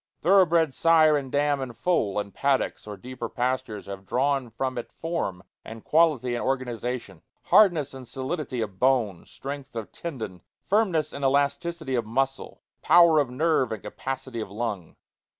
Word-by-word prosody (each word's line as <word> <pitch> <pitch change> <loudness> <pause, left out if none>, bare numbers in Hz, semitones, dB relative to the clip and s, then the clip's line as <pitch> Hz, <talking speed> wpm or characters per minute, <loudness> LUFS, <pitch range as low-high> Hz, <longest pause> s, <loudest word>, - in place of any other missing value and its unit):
Thorough 190 0 +5
bred 165 -3 +2
sire 160 -1 +5
and 135 -3 -3
dam 145 -1 +1
and 125 -3 -6
foal 110 - +1
in 100 -1 -5
paddocks 135 -3 0
or 105 -1 -7
deeper 120 +2 -7
pastures 125 -4 -2
have 100 -1 -7
drawn 135 -1 0
from 130 +2 -3
it - - -8
form 160 - -3 0.2
and 110 0 -10
quality 150 -7 +2
and 120 - -2
organization: 125 -7 -3 0.2
hardness 165 -10 +4
and 130 -2 -9
solidity 130 -1 -3
of 95 -4 -5
bone, 120 -9 +1
strength 140 -1 -8
of 115 -2 -5
tendon, 110 - -6 0.2
firmness 185 -7 +1
and 140 - -6
elasticity 140 +2 0
of 120 -3 0
muscle, 135 +4 -2 0.2
power 170 -2 +6
of 140 -4 +1
nerve, 130 -1 +1
and 110 -3 -5
capacity 130 +3 -5
of 110 - -5
lung. 100 -5 -4
130 Hz, 160 wpm, -26 LUFS, 115-155 Hz, 0.2 s, power